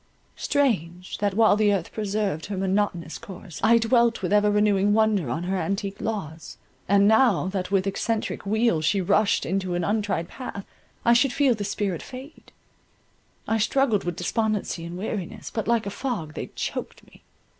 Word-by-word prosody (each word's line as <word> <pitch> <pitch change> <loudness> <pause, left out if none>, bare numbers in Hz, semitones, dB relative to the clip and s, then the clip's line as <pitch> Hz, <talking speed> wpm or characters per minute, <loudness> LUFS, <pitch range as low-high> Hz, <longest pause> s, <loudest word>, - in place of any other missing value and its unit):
Strange, 185 - -1
that 205 -2 0
while 220 -1 +5
the 210 -1 +3
earth 190 -4 -1
preserved 205 -6 -2
her 200 -1 -4
monotonous 190 -3 -1
course, 190 -6 -10
I 230 +1 +6
dwelt 230 -1 +2
with 180 - 0
ever 210 0 +4
renewing 205 -1 +3
wonder 215 - +2
on 160 +8 -2
her 185 +2 -1
antique 195 +1 -3
laws, 165 -8 -5 0.3
and 200 0 +5
now 220 -4 +4
that 185 -2 -3
with 195 -1 +1
excentric 215 +3 -2
wheel 215 -4 +1
she 195 +6 +2
rushed 200 +3 +2
into 185 0 -1
an 175 - -1
untried 205 -4 -1
path, 200 -3 -7 0.4
I 235 - +6
should 240 +3 +4
feel 275 -4 +3
this 205 -2 -4
spirit 200 -4 -2
fade; 265 +4 -11 1.0
I 225 - +1
struggled 235 -2 +2
with 175 -1 -3
despondency 215 -6 -1
and 170 +1 -7
weariness, 195 -2 -5
but 220 - -3
like 235 -1 +2
a 200 - -3
fog, 200 - -4
they - - -5
choked - - -5
me. - - -20
205 Hz, 170 wpm, -25 LUFS, 185-220 Hz, 1.0 s, I